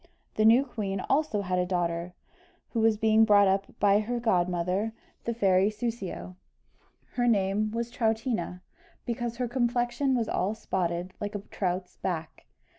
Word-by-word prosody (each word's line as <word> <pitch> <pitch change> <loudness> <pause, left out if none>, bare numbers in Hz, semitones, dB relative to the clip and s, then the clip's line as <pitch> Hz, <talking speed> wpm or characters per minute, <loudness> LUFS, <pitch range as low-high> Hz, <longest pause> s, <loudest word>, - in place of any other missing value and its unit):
The 215 - +2
new 235 +5 +6
queen 200 -6 -3
also 275 -8 +1
had 180 -1 0
a 180 - +1
daughter, 175 -1 -2 0.5
who 230 - -2
was 220 -1 +3
being 220 0 +4
brought 205 -2 +6
up 195 +1 +1
by 200 0 +5
her 240 +3 -2
godmother, 180 0 0 0.3
the 235 - -1
fairy 195 -2 +3
Soussio 210 -5 -5 0.7
her 245 -1 0
name 205 -1 +2
was 230 +2 -3
Troutina, 220 -6 -1 0.4
because 235 0 -3
her 250 -1 -1
complexion 245 +2 0
was 230 -3 0
all 200 +4 -1
spotted 180 -4 -2
like 205 0 -4
a 205 - -3
trout's 180 -1 -3
back. 165 -4 -5
210 Hz, 150 wpm, -28 LUFS, 185-235 Hz, 0.7 s, new